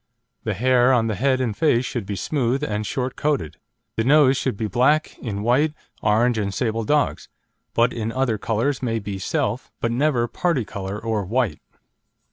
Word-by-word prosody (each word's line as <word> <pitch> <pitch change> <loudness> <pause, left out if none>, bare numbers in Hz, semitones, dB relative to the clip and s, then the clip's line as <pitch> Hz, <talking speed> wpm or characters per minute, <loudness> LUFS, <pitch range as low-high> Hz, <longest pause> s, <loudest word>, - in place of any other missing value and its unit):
The 110 -3 -1
hair 125 +3 +4
on 120 -3 +3
the 110 - -1
head 130 +5 +1
and 120 -5 -1
face 130 -4 +2
should 115 -6 -4
be 100 - -3
smooth 130 - -1
and 105 -5 -2
short 130 0 -2
coated. 135 - -1 0.4
The 115 - +2
nose 140 +1 +5
should 130 -5 -1
be 110 - -2
black 130 +9 +2
in 105 -3 -4
white, 145 +7 +2 0.3
orange 115 +2 +2
and 100 -2 -1
sable 115 +2 -1
dogs; 150 +5 0 0.5
but 115 +1 +3
in 115 -1 -3
other 125 -4 0
colours 115 +6 0
may 115 -3 -1
be 100 -2 -5
self, - - -2
but 115 - 0
never 125 -1 +1
parti 165 -4 0
colour 95 0 -5
or 110 -2 -1
white. 110 - -1
120 Hz, 180 wpm, -23 LUFS, 105-130 Hz, 0.5 s, nose